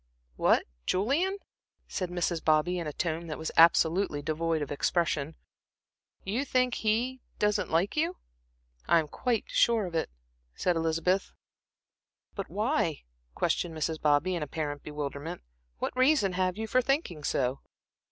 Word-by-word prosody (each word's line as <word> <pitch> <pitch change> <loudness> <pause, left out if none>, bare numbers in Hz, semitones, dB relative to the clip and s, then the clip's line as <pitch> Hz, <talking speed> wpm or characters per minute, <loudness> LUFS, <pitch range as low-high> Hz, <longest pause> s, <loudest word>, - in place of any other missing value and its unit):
"What, - - +3 0.2
Julian," 290 - +1 0.5
said 185 -3 -3
Mrs. 175 -2 -1
Bobby, 160 +3 +2
in 170 - -4
a - - -2
tone 165 +1 -2
that 155 - -4
was 160 - -4
absolutely 165 -1 +4
devoid 160 0 0
of 145 - -7
expression. 155 0 0 0.9
"You 220 +8 -1
think 255 -2 +1
he 240 +4 0 0.2
doesn't 210 0 +1
like 170 +5 +1
you?" 330 +4 0 0.7
"I - - +5
am 160 -2 +1
quite 235 - -1
sure 230 -3 +3
of 175 - -7
it," 160 - 0 0.5
said 180 - +1
Elizabeth. 165 +4 0 1.0
"But 195 - -5
why," 210 - 0 0.3
questioned 165 -2 0
Mrs. 155 +1 -2
Bobby, 150 +5 +3
in 170 - -2
apparent 145 -1 -3
bewilderment. 150 +2 -5 0.3
"What - - -3
reason 255 -7 +3
have 185 0 0
you 220 - -2
for 255 +4 +2
thinking 250 - -1
so?" 130 -1 0
175 Hz, 140 wpm, -29 LUFS, 155-215 Hz, 1.0 s, I